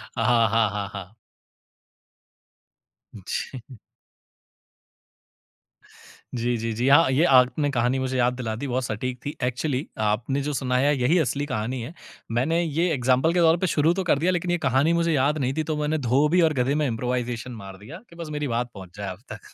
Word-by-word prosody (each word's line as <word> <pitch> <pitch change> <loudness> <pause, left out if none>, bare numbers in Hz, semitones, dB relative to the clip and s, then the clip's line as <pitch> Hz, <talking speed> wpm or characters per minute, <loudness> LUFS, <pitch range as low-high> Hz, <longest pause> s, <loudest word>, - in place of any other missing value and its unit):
हाँ, 115 -3 +3
हाँ, 115 -1 +2
हाँ, 100 0 -4
हाँ। 100 +1 -8 2.0
जी। 115 +4 -6 2.6
जी, 120 0 -1
जी, 115 0 -3
जी, 120 +4 -1
हाँ, 145 +1 +6
ये 140 +5 +3
आपने 135 +2 +4
कहानी 125 +1 +1
मुझे 130 0 -2
याद 125 0 +2
दिला 115 -3 -4
दी 140 +5 -5
बहुत 125 +1 -1
सटीक 125 +3 -3
थी। 145 - -4
एक्चुअली 125 +3 -1 0.2
आपने 120 +6 0
जो 145 +1 -3
सुना 125 -1 0
है 145 +3 +3
यही 150 +9 +3
असली 145 -1 -1
कहानी 125 -1 -3
है। 120 +8 -7 0.4
मैंने 150 +9 +1
ये 165 +3 0
एग्ज़ाम्पल 130 +4 +2
के 180 - +2
तौर 165 0 +5
पे 185 +1 -1
शुरू 160 +2 +2
तो 190 +1 -2
कर 150 -5 +2
दिया 175 +3 +2
लेकिन 175 0 -1
ये 175 - +2
कहानी 140 +2 +2
मुझे 170 -1 +1
याद 145 +2 +2
नहीं 130 -2 -1
थी, 155 - +1
तो 155 -1 -3
मैंने 150 +1 0
धोबी 145 +7 +2
और 160 -2 +3
गधे 135 +2 0
में 150 -1 +1
इम्प्रोवाइज़ेशन 125 0 -3
मार 100 -5 -9
दिया 140 - -11
कि 170 - -16
बस 170 -2 -7
मेरी 150 -1 -2
बात 120 +1 -1
पहुँच 95 -1 -12
जाए 100 - -5
आप 95 +1 -8
तक। 105 - -11
130 Hz, 190 wpm, -24 LUFS, 120-150 Hz, 2.6 s, हाँ